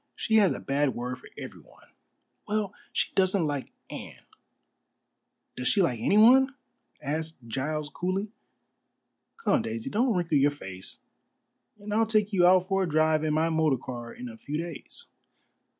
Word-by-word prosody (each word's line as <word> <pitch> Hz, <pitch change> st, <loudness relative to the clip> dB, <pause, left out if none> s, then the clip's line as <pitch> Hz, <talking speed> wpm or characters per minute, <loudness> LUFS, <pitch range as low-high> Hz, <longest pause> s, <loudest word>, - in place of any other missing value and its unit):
"She 220 Hz, -, +2 dB
has 200 Hz, -4 st, +5 dB
a -, -, -3 dB
bad 140 Hz, -1 st, 0 dB
word 125 Hz, +1 st, -4 dB
for -, -, -14 dB
everyone." -, -, -11 dB, 0.6 s
"Well, 210 Hz, -2 st, -1 dB, 0.2 s
she -, -, 0 dB
doesn't 185 Hz, -2 st, +2 dB
like 145 Hz, -3 st, -3 dB, 0.2 s
Anne." -, -, -9 dB, 1.3 s
"Does 125 Hz, -, -3 dB
she 200 Hz, -3 st, +4 dB
like 125 Hz, -9 st, 0 dB
anyone?" 250 Hz, -, +5 dB, 0.5 s
asked 160 Hz, +3 st, -3 dB
Giles 150 Hz, +5 st, -2 dB
coolly. 190 Hz, +4 st, -2 dB, 1.1 s
"Come, 460 Hz, -, +2 dB
Daisy, 115 Hz, 0 st, -4 dB
don't 235 Hz, +1 st, +2 dB
wrinkle 165 Hz, -5 st, +2 dB
your 140 Hz, +1 st, +5 dB
face, 95 Hz, -10 st, -8 dB, 0.8 s
and 205 Hz, 0 st, -6 dB
I'll 225 Hz, +1 st, +3 dB
take 215 Hz, -1 st, +2 dB
you 175 Hz, -2 st, +5 dB
out 185 Hz, 0 st, +5 dB
for 195 Hz, 0 st, +1 dB
a 185 Hz, -, 0 dB
drive 155 Hz, 0 st, +3 dB
in 155 Hz, -1 st, +1 dB
my 160 Hz, +1 st, +2 dB
motor 160 Hz, -4 st, +2 dB
car 120 Hz, -1 st, -7 dB
in 125 Hz, -, -8 dB
a 115 Hz, -2 st, -9 dB
few 145 Hz, +6 st, -4 dB
days." 170 Hz, -, -5 dB
160 Hz, 155 wpm, -28 LUFS, 140-200 Hz, 1.3 s, has